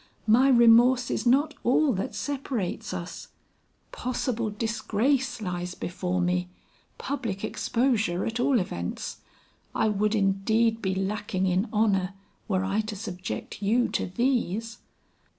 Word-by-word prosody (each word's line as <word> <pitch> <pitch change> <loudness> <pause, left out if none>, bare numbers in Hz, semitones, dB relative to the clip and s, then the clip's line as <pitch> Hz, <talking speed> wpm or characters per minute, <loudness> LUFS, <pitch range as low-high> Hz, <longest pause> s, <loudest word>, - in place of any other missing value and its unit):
My 240 +5 +5
remorse 240 +1 +6
is - - -1
not 285 +5 +3
all 265 +4 +3
that 190 - -3
separates 265 -9 -3
us; - - -6 0.6
possible 245 -2 -2
disgrace 230 +3 -1
lies 180 -1 -4
before 180 0 -3
me; 180 0 0 0.5
public 230 -9 -4
exposure 220 -5 0
at 225 +1 -3
all 255 0 +3
events; 85 - -4 0.6
I 220 - +2
would 210 +1 +1
indeed 220 +3 +2
be 190 -2 -1
lacking 195 0 -1
in 185 +4 +1
honor 195 -3 +1 0.3
were 190 -2 +1
I 195 +3 +1
to 215 0 -6
subject 185 -1 -6
you 230 +5 +2
to - - -1
these." 230 0 -1
215 Hz, 125 wpm, -27 LUFS, 190-240 Hz, 0.6 s, remorse